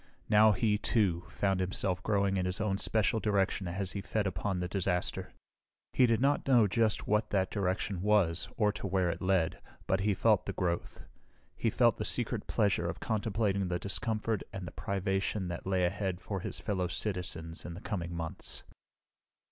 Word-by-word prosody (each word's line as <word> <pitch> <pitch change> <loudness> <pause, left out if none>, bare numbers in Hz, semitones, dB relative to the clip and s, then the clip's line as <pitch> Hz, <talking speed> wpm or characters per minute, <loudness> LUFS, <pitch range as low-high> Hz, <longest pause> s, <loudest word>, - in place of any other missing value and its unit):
Now, 110 +1 +7
he, 105 +1 +1
too, 95 -7 +1
found 95 -2 0
himself 90 0 0
growing 100 -1 +1
in 90 -1 0
his 90 +1 -2
own 100 -2 0
special 110 +1 +1
direction 100 -3 +1
as 95 +2 -3
he 100 - -4
fed 105 +1 -1
upon 95 0 -1
the 90 - -1
disaster. 90 -1 -1 0.6
He 125 - +5
did 115 -1 +2
not 140 +2 +2
know 120 -5 +6
just 110 +1 +1
what 105 +1 +2
that 95 -2 +1
direction 95 -1 -1
was 90 -5 +2
or 105 -2 +3
to 100 - -5
where 95 -2 +1
it - - -6
led, 90 -3 +1 0.3
but 95 - +1
he 100 +1 +1
felt 110 0 +3
the - - -2
growth. 85 -2 -2 0.5
He - - 0
felt - - +3
the - - -2
secret - - -2
pleasure - - +1
of - - -5
contemplating 105 -3 0
the 90 0 0
discomfort 110 +3 -1
and 95 -2 -6
the - - -6
privation 95 0 -1
that 85 +2 -5
lay 95 -2 +2
ahead 95 0 -1
for 100 +1 -4
his - - -5
fellow 95 -4 -1
citizens 85 -3 -4
in 85 - -7
the - - -7
coming 90 -5 -3
months. 80 -1 -4
95 Hz, 180 wpm, -31 LUFS, 90-105 Hz, 0.6 s, Now